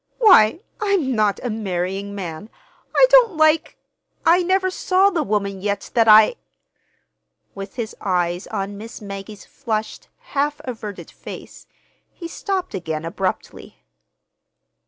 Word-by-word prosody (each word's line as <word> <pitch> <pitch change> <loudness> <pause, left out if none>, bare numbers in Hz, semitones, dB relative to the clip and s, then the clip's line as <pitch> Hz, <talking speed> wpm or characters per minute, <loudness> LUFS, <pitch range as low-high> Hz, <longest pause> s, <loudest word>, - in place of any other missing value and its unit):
Why, 360 - +6 0.2
I'm 390 -11 +1
not 215 -3 +1
a 245 - -2
marrying 195 -1 -3
man. 180 +1 -6 0.5
I - - +7
don't 475 -8 +6
like—I 320 +2 +1
never 375 +1 +1
saw 380 +2 +2
the 340 -4 0
woman 200 -4 -2
yet 200 0 -3
that 230 -1 +3
I—" 215 - +7 1.2
With 195 0 -8
his 230 -3 -5
eyes 180 -1 -1
on 200 -1 -4
Miss 225 +2 -9
Maggie's 200 0 -9
flushed, 220 -5 -4 0.3
half 290 +1 0
averted 220 -5 -7
face, - - -11 0.4
he 340 - -8
stopped 375 - -3
again 160 -4 -4
abruptly. 185 +2 -4
215 Hz, 120 wpm, -21 LUFS, 195-325 Hz, 1.2 s, I